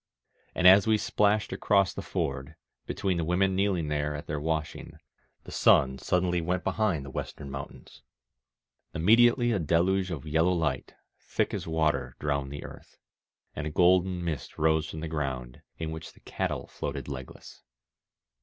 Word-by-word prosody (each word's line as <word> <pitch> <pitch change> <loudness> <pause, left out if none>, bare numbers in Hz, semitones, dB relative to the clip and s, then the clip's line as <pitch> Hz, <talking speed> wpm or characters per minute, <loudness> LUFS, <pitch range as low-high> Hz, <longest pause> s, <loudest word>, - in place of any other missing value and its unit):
And 90 - 0
as 95 +3 +8
we 110 -1 +4
splashed 105 0 +1
across 100 -3 +2
the - - -5
ford, 70 +3 -3 0.3
between 95 -3 -1
the 85 - 0
women 95 +3 +1
kneeling 95 -5 +1
there 75 0 -1
at 75 - -7
their 75 0 -3
washing, 80 0 -3 0.5
the - - -11
sun 65 -1 +4
suddenly 90 +1 0
went 90 +1 -1
behind 95 -10 0
the 70 - -8
western 70 +1 -6
mountains. 70 0 -9 0.9
Immediately 120 +7 +4
a 105 - +1
deluge 90 +4 +1
of 80 -6 -5
yellow 80 +4 +2
light, 80 -4 -2 0.2
thick - - -2
as - - -4
water, 80 -2 0
drowned 70 -2 -2
the 70 - -7
earth, - - -12 0.6
and 75 - -3
a - - -2
golden 90 +2 +3
mist 75 -6 -4
rose 80 0 +2
from 80 - -7
the 80 - -3
groui^d, 65 -5 -4 0.2
in 80 -1 -4
which 80 0 -8
the - - -21
cattle - - -3
floated - - -5
legless. 65 -3 -9
80 Hz, 160 wpm, -28 LUFS, 75-95 Hz, 0.9 s, as